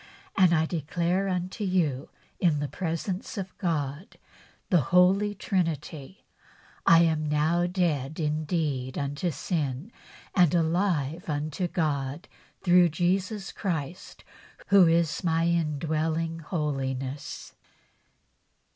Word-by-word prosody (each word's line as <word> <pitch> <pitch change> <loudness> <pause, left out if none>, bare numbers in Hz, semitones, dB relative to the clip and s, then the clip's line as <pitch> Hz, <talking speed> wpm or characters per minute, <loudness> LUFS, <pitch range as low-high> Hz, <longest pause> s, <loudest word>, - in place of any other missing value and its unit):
And 185 -3 +5
I 160 -2 +3
declare 170 +4 -1
unto 185 +3 -3
you 165 -8 0 0.3
in 165 -5 +2
the 145 - -2
presence 180 +5 -4
of 190 -2 -5
God 155 -1 -3 0.5
the 175 -4 +5
Holy 185 +7 +3
Trinity 165 -3 -3 0.6
I 165 0 +7
am 155 -2 +1
now 160 +4 +2
dead 160 -6 -1
indeed 150 -4 -1
unto 145 +5 -2
sin 150 - -3 0.4
and 180 -4 +4
alive 165 -2 0
unto 155 +4 -2
God, 145 -3 -2 0.4
through 180 -1 +5
Jesus 185 +5 -1
Christ, 170 -3 -5 0.5
who 195 -3 +7
is 165 +1 +1
my 165 -1 +2
indwelling 160 0 0
holiness." 140 -4 -4
165 Hz, 100 wpm, -27 LUFS, 150-180 Hz, 0.6 s, I